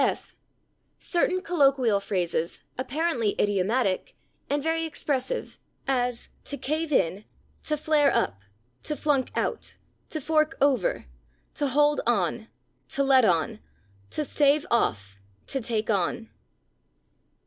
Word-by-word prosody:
f. -, -, -2 dB, 0.6 s
"Certain 365 Hz, +1 st, 0 dB
colloquial 275 Hz, -, +3 dB
phrases, 175 Hz, -4 st, -2 dB
apparently 260 Hz, -4 st, 0 dB
idiomatic, 205 Hz, +1 st, +1 dB, 0.3 s
and 285 Hz, 0 st, 0 dB
very 325 Hz, +1 st, 0 dB
expressive," 305 Hz, -, -3 dB, 0.3 s
as 245 Hz, -3 st, -1 dB
/to 285 Hz, -, -5 dB
cave 310 Hz, +4 st, -1 dB
in/, 195 Hz, -, +1 dB, 0.4 s
/to 305 Hz, -, -1 dB
flare 295 Hz, -1 st, +3 dB
up/, 100 Hz, -, 0 dB, 0.4 s
/to 300 Hz, -, -2 dB
flunk 285 Hz, -4 st, +1 dB
out/, -, -, -2 dB, 0.3 s
/to 310 Hz, -, -2 dB
fork 310 Hz, +1 st, +1 dB
over/, 265 Hz, -9 st, +2 dB, 0.5 s
/to 290 Hz, -, 0 dB
hold 295 Hz, +2 st, +3 dB
on/, 220 Hz, 0 st, 0 dB, 0.4 s
/to 275 Hz, -, +1 dB
let 265 Hz, -2 st, +6 dB
on/, 185 Hz, +4 st, +1 dB, 0.5 s
/to 300 Hz, -, -2 dB
stave 290 Hz, +1 st, +3 dB
off/, 100 Hz, -, 0 dB, 0.3 s
/to 270 Hz, -3 st, -3 dB
take 220 Hz, -1 st, 0 dB
on 205 Hz, +3 st, -1 dB
265 Hz, 115 wpm, -26 LUFS, 210-300 Hz, 0.6 s, let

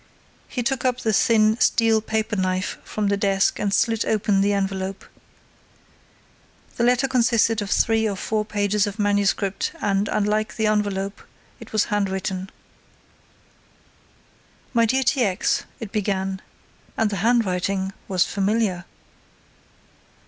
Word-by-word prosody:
He 245 Hz, -, -3 dB
took 255 Hz, +1 st, -1 dB
up 255 Hz, -1 st, 0 dB
the 220 Hz, -, 0 dB
thin, 220 Hz, 0 st, +3 dB
steel, 225 Hz, -3 st, +3 dB
paper 220 Hz, 0 st, -2 dB
knife 185 Hz, -1 st, -1 dB
from 210 Hz, -2 st, -2 dB
the 200 Hz, -, +1 dB
desk 195 Hz, -1 st, +1 dB
and 205 Hz, -1 st, 0 dB
slit 225 Hz, +2 st, +2 dB
open 205 Hz, -2 st, +1 dB
the 200 Hz, +1 st, +2 dB
envelope. 195 Hz, -1 st, -2 dB, 1.7 s
The 235 Hz, -, +1 dB
letter 250 Hz, +2 st, +3 dB
consisted 230 Hz, -3 st, +2 dB
of 205 Hz, -, -4 dB
three 225 Hz, -1 st, +2 dB
or 200 Hz, -, -3 dB
four 215 Hz, +3 st, -1 dB
pages 205 Hz, 0 st, 0 dB
of 205 Hz, +1 st, -6 dB
manuscript 205 Hz, -1 st, 0 dB
and, 200 Hz, 0 st, 0 dB
unlike 215 Hz, +1 st, 0 dB
the 220 Hz, -, 0 dB
envelope, 205 Hz, -2 st, -1 dB, 0.4 s
it -, -, -12 dB
was 215 Hz, -1 st, +2 dB
handwritten. 190 Hz, -1 st, -2 dB, 2.2 s
"My 230 Hz, -1 st, +3 dB
dear 265 Hz, +4 st, +1 dB
T. 260 Hz, -, +1 dB
X.," 190 Hz, -4 st, 0 dB
it 220 Hz, -4 st, -7 dB
began, 195 Hz, -2 st, -2 dB, 0.6 s
and 220 Hz, -2 st, +1 dB
the 200 Hz, -, -2 dB
handwriting 195 Hz, -3 st, 0 dB
was 185 Hz, -2 st, +2 dB
familiar. 200 Hz, -2 st, -1 dB
205 Hz, 130 wpm, -23 LUFS, 195-225 Hz, 2.2 s, thin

